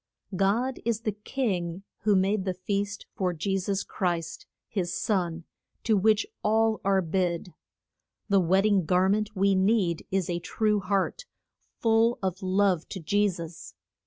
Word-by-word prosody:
God 225 Hz, +8 st, +1 dB
is 230 Hz, -1 st, -1 dB
the 220 Hz, -, -1 dB
king 195 Hz, -5 st, -3 dB, 0.2 s
who 210 Hz, 0 st, +2 dB
made 195 Hz, +1 st, +2 dB
the 185 Hz, -1 st, -2 dB
feast 200 Hz, +2 st, -3 dB
for 180 Hz, -2 st, -1 dB
Je 195 Hz, +4 st, -1 dB
sus 195 Hz, +1 st, -1 dB
Christ, 175 Hz, -4 st, -3 dB, 0.2 s
his 180 Hz, -4 st, -2 dB
son, 175 Hz, -5 st, -1 dB, 0.4 s
to 220 Hz, -, +3 dB
which 215 Hz, +2 st, +3 dB, 0.2 s
all 220 Hz, +1 st, +2 dB
are 195 Hz, -1 st, +2 dB
bid. 175 Hz, 0 st, -1 dB, 0.7 s
The 200 Hz, -2 st, +4 dB
wed 190 Hz, +2 st, +3 dB
ding 200 Hz, -5 st, +3 dB
gar 180 Hz, +3 st, +3 dB
ment 210 Hz, +1 st, 0 dB
we 195 Hz, +1 st, +3 dB
need 190 Hz, -3 st, +1 dB
is 190 Hz, -2 st, 0 dB
a 175 Hz, -1 st, -1 dB
true 210 Hz, +3 st, 0 dB
heart, 200 Hz, -, -1 dB, 0.5 s
full 225 Hz, +1 st, +3 dB
of 190 Hz, +1 st, -2 dB
love 185 Hz, -2 st, +1 dB
to 190 Hz, -, -5 dB
Je 205 Hz, +5 st, +2 dB
sus. 170 Hz, -3 st, -8 dB
195 Hz, 155 wpm, -27 LUFS, 180-210 Hz, 0.7 s, The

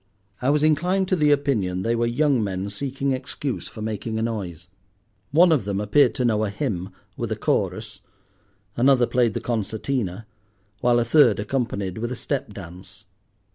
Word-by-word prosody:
I 130 Hz, -, +1 dB
was 150 Hz, +1 st, +2 dB
inclined 180 Hz, +5 st, +2 dB
to 185 Hz, -, +3 dB
the 150 Hz, -4 st, +3 dB
opinion 115 Hz, -11 st, +1 dB
they 115 Hz, +2 st, +1 dB
were 120 Hz, 0 st, +1 dB
young 130 Hz, 0 st, +2 dB
men 95 Hz, 0 st, -3 dB
seeking 135 Hz, +5 st, -2 dB
excuse 130 Hz, 0 st, -4 dB
for 110 Hz, -, -8 dB
making 110 Hz, +1 st, -3 dB
a 110 Hz, -, -1 dB
noise. 95 Hz, -7 st, -4 dB, 0.6 s
One 170 Hz, +4 st, +5 dB
of 150 Hz, -8 st, +3 dB
them 100 Hz, 0 st, -2 dB
appeared 105 Hz, +8 st, +3 dB
to 125 Hz, -, 0 dB
know 110 Hz, -2 st, +2 dB
a 105 Hz, -, 0 dB
hymn 100 Hz, -4 st, -3 dB, 0.3 s
with -, -, -4 dB
a -, -, +1 dB
chorus, -, -, -2 dB, 0.7 s
another 125 Hz, 0 st, +4 dB
played 120 Hz, -2 st, +1 dB
the -, -, -2 dB
concertina, 110 Hz, -2 st, -2 dB, 0.5 s
while 120 Hz, +1 st, +3 dB
a 120 Hz, -, +1 dB
third 145 Hz, +1 st, +5 dB
accompanied 105 Hz, -4 st, -2 dB
with 120 Hz, +2 st, -3 dB
a -, -, -2 dB
step 135 Hz, -1 st, -3 dB
dance. 95 Hz, +1 st, -11 dB
115 Hz, 175 wpm, -23 LUFS, 100-140 Hz, 0.7 s, One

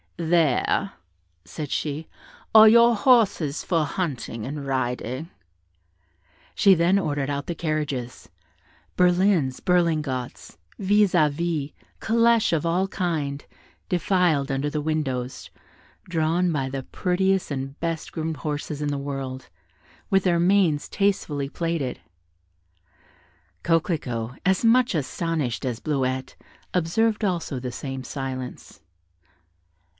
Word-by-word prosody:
"There," 170 Hz, +3 st, +1 dB, 0.5 s
said 140 Hz, +10 st, -6 dB
she, 150 Hz, +1 st, -3 dB, 0.5 s
"are 220 Hz, 0 st, +10 dB
your 235 Hz, +1 st, +6 dB
horses 205 Hz, -, +3 dB
for 165 Hz, -4 st, +1 dB
hunting 140 Hz, -, -4 dB
and 140 Hz, +1 st, -5 dB
riding." 130 Hz, +3 st, -2 dB, 1.2 s
She 195 Hz, -2 st, +5 dB
then 175 Hz, +4 st, +3 dB
ordered 145 Hz, -6 st, -2 dB
out 140 Hz, 0 st, -3 dB
the 170 Hz, -, -3 dB
carriages: 150 Hz, -, -3 dB, 0.7 s
berlins, 180 Hz, -6 st, +3 dB
berlingots, 155 Hz, -8 st, -1 dB, 0.2 s
vis 205 Hz, 0 st, +3 dB
à 155 Hz, -4 st, +4 dB
vis, 155 Hz, -2 st, -2 dB, 0.3 s
calêches 230 Hz, -2 st, +3 dB
of 165 Hz, 0 st, 0 dB
all 180 Hz, +3 st, +1 dB
kinds, 155 Hz, -7 st, -2 dB, 0.4 s
defiled 175 Hz, -5 st, +1 dB
under 135 Hz, +2 st, -1 dB
the 150 Hz, 0 st, -2 dB
windows, 135 Hz, -5 st, -3 dB, 0.6 s
drawn 170 Hz, +1 st, +1 dB
by 135 Hz, -4 st, -1 dB
the 135 Hz, 0 st, -4 dB
prettiest 190 Hz, +4 st, 0 dB
and 135 Hz, -1 st, -5 dB
best 165 Hz, -2 st, -3 dB
groomed 160 Hz, -1 st, -3 dB
horses 145 Hz, +1 st, -4 dB
in 150 Hz, -1 st, -1 dB
the 145 Hz, -1 st, -2 dB
world, 135 Hz, -2 st, -5 dB, 0.6 s
with 195 Hz, -1 st, +4 dB
their 175 Hz, -2 st, +2 dB
manes 175 Hz, -4 st, +3 dB
tastefully 155 Hz, -9 st, -1 dB
plaited. 165 Hz, -5 st, -2 dB, 1.6 s
Coquelicot, 140 Hz, -8 st, -1 dB
as 190 Hz, +3 st, +2 dB
much 245 Hz, +1 st, +4 dB
astonished 155 Hz, -4 st, -2 dB
as 120 Hz, -3 st, -2 dB
Bleuette, 130 Hz, -3 st, -2 dB, 0.4 s
observed 215 Hz, +6 st, +1 dB
also 170 Hz, -8 st, -1 dB
the 125 Hz, 0 st, -5 dB
same 135 Hz, 0 st, -6 dB
silence. 130 Hz, -2 st, -6 dB
155 Hz, 110 wpm, -24 LUFS, 135-180 Hz, 1.6 s, are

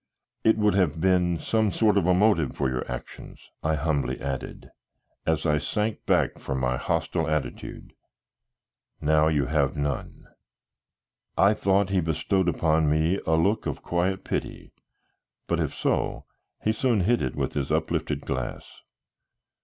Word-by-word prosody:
"It 110 Hz, 0 st, +4 dB
would 105 Hz, -1 st, +3 dB
have 90 Hz, -5 st, +1 dB
been 90 Hz, -1 st, +2 dB
some 110 Hz, +4 st, +1 dB
sort 105 Hz, +1 st, +2 dB
of 95 Hz, -4 st, +2 dB
a 90 Hz, -, +5 dB
motive 90 Hz, -, +2 dB
for 70 Hz, -, 0 dB
your 65 Hz, 0 st, -3 dB
actions," -, -, -9 dB
I 80 Hz, 0 st, +1 dB
humbly 70 Hz, -4 st, -1 dB
added, 65 Hz, -1 st, -5 dB, 0.6 s
as 80 Hz, -1 st, +1 dB
I 75 Hz, -1 st, +2 dB
sank 105 Hz, +6 st, -2 dB
back -, -, +2 dB
from 65 Hz, -1 st, -3 dB
my 65 Hz, 0 st, 0 dB
hostile 80 Hz, +5 st, -1 dB
attitude; 75 Hz, -2 st, -4 dB, 1.1 s
"now 75 Hz, +1 st, +3 dB
you 75 Hz, -3 st, +2 dB
have 70 Hz, -1 st, 0 dB
none." 70 Hz, -1 st, -3 dB, 1.1 s
I 100 Hz, +2 st, +5 dB
thought 100 Hz, -1 st, +2 dB
he 95 Hz, -2 st, +2 dB
bestowed 85 Hz, +3 st, 0 dB
upon 80 Hz, -2 st, +2 dB
me 80 Hz, +5 st, +2 dB
a 80 Hz, -, +3 dB
look 100 Hz, +7 st, +1 dB
of -, -, -4 dB
quiet 90 Hz, +2 st, -1 dB
pity, -, -, -4 dB, 0.7 s
but -, -, -1 dB
if -, -, 0 dB
so -, -, -1 dB, 0.4 s
he 110 Hz, -, +2 dB
soon 115 Hz, -2 st, +1 dB
hid 115 Hz, +6 st, +2 dB
it 65 Hz, -, -2 dB
with -, -, -2 dB
his 70 Hz, 0 st, -2 dB
uplifted 80 Hz, -1 st, -1 dB
glass. 65 Hz, -3 st, -5 dB
80 Hz, 150 wpm, -26 LUFS, 75-95 Hz, 1.1 s, a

